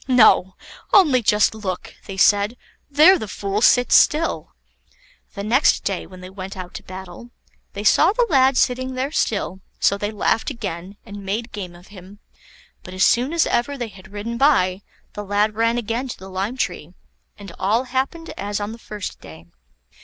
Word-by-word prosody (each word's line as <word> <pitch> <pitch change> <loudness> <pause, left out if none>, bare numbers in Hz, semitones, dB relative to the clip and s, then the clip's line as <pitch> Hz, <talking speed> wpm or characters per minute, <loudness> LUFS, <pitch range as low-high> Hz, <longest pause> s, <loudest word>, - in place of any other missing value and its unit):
"No! 215 -7 +5 0.4
only 295 -11 +5
just 210 -1 +3
look," 195 -5 -5
they 195 - -7
said; 205 +4 +3 0.3
"there 315 +6 +6
the 220 - -5
fool 200 +1 -3
sits 245 +1 +4
still." 320 +2 +2 0.8
The 200 - -5
next 245 +7 +3
day 195 -2 -3
when 185 -1 -13
they 185 - -9
went 190 0 -8
out 180 -1 -8
to - - -8
battle, 185 +4 -10 0.4
they 200 - -6
saw 215 - +5
the 485 +3 +1
lad 265 -5 +3
sitting 255 +1 0
there 265 +3 -2
still, 200 - -2 0.2
so 200 - +2
they 205 - -2
laughed 220 +3 0
again, 200 - -6
and 200 0 -9
made 215 +5 -3
game 185 -4 -7
of 175 +1 -17
him; 195 0 -13 0.6
but 185 - -10
as 190 - +2
soon 245 +7 +3
as 335 -1 +2
ever 280 +4 -1
they 240 -3 -4
had 195 +1 -15
ridden 225 +3 -5
by, 190 -10 +3 0.3
the 210 - -6
lad 205 +2 0
ran 230 +2 +1
again 235 +3 -2
to 245 - -7
the 190 0 -11
lime 195 +7 -3
tree, 175 -8 -4 0.4
and 200 -3 -10
all 215 +6 +1
happened 265 +6 -3
as 205 +1 -3
on 205 +1 -4
the 230 - -10
first 210 -3 -7
day. 80 +1 -13
210 Hz, 185 wpm, -21 LUFS, 190-250 Hz, 0.8 s, there